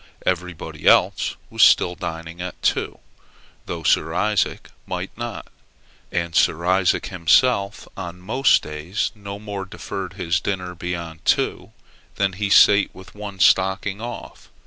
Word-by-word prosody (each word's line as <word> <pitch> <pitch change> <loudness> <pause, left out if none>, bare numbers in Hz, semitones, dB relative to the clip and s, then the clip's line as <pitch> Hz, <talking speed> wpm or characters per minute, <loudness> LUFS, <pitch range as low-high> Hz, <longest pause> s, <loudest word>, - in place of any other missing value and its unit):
Everybody 90 -2 -3
else - - +4 0.2
was - - -1
still 90 - +6
dining 85 -1 -6
at 90 0 -6
two, - - 0 0.7
though 85 -1 -5
Sir 80 +2 +2
Isaac 105 +1 0 0.2
might - - -5
not; - - -6 0.7
and 85 -1 -2
Sir 85 +2 +2
Isaac 90 0 +2
himself 100 +4 +2
on 90 -1 -7
most 115 +8 +3
days 75 +7 -3
no 100 -2 -8
more 100 -2 -6
deferred 95 - -6
his 85 +2 0
dinner 90 -1 -3
beyond 85 -2 -6
two, - - 0 0.4
than 100 -1 0
he 100 +2 -2
sate 100 +1 +6
with 95 +2 -13
one 105 -2 -8
stocking 95 +2 +2
off. 120 +1 -8
95 Hz, 135 wpm, -22 LUFS, 85-100 Hz, 0.7 s, still